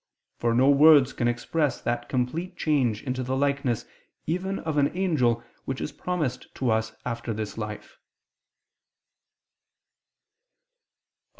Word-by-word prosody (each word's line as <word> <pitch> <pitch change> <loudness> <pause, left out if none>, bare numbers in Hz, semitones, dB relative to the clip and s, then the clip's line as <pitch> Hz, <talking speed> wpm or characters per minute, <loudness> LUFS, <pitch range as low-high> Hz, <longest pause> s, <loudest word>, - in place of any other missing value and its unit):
For 115 -1 +1
no 130 +3 +4
words 145 -1 +7
can 120 - 0
express 125 +3 0
that 120 0 -2
complete 165 +9 -2
change 130 -9 +1
into 130 -1 -2
the 130 +1 -1
likeness 140 -4 0 0.4
even 185 +4 -1
of 160 -2 -3
an 145 0 +4
angel, 125 -11 +2 0.2
which 135 0 -3
is - - -3
promised 175 -8 -3
to 130 -3 0
us 110 0 0
after 115 -1 -3
this 110 -1 -4
life." 105 -1 -7
130 Hz, 120 wpm, -26 LUFS, 120-150 Hz, 0.4 s, words